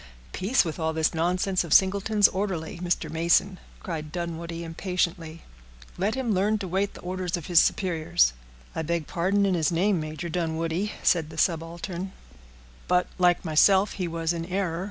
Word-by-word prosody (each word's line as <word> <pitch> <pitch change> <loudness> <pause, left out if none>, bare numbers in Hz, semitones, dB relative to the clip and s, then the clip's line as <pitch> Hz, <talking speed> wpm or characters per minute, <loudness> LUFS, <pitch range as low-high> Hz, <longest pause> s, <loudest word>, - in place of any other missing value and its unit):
"Peace, 205 +3 +2
with 160 +1 -5
all 160 0 0
this 160 0 +1
nonsense 180 +3 0
of 170 - +2
Singleton's 200 +2 +4
orderly, 185 -4 -3
Mr. 175 -2 -1
Mason," 170 +4 +1 0.2
cried 155 -4 -5
Dunwoodie, 170 0 -5
impatiently; 165 -1 -3 0.5
"let 200 +6 -1
him 255 -5 -1
learn 205 +3 +2
to 200 -2 -5
wait 195 +3 -1
the - - -11
orders 180 -1 -3
of 170 - -8
his 175 -2 +5
superiors." 175 - +2 0.4
"I - - -1
beg 165 0 -2
pardon 195 +6 +1
in 195 - +1
his 165 -1 +1
name, 185 +2 +2
Major 155 +2 -5
Dunwoodie," 165 +3 -2
said 160 -3 +2
the 160 - -11
subaltern; 170 +3 -2 0.7
"but, 180 0 +3
like 180 0 +3
myself, 190 +5 +4
he 180 -2 -3
was 165 0 -1
in 165 -1 -4
error. 180 -2 -2
175 Hz, 165 wpm, -26 LUFS, 165-190 Hz, 0.7 s, his